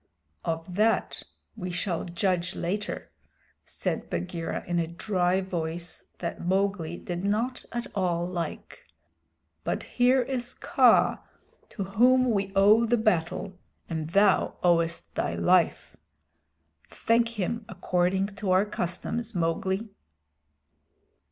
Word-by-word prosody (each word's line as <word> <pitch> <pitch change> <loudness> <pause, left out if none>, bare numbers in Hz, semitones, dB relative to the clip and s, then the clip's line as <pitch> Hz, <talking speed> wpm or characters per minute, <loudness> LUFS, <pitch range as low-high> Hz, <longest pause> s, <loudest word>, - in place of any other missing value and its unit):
"Of 165 +2 -3
that 215 +4 +1 0.3
we 180 - -5
shall 175 -1 -2
judge 175 0 -1
later," 205 +4 -3 0.5
said - - -3
Bagheera, 90 - -3
in 175 -1 0
a 165 - 0
dry 180 +1 0
voice 170 -2 -4
that 170 - -4
Mowgli 185 -2 0
did 175 0 -5
not 225 +6 -1
at 240 0 -3
all 175 -3 0
like. 175 -2 -5 0.8
"But - - -2
here 250 +1 +3
is 245 -1 -3
Kaa 265 -8 +4 0.5
to 200 - -4
whom 250 +6 +4
we 195 -2 0
owe 210 +4 +6
the 240 +2 +3
battle 185 -2 0 0.3
and 160 -2 -3
thou 200 +2 +3
owest 170 -1 +1
thy - - -1
life. 180 -2 +2 0.9
Thank 230 0 +1
him 225 +5 -1
according 185 0 +1
to 205 -3 -3
our 185 +2 +4
customs, 210 +4 -3
Mowgli." 190 +5 0
185 Hz, 115 wpm, -27 LUFS, 175-215 Hz, 0.9 s, owe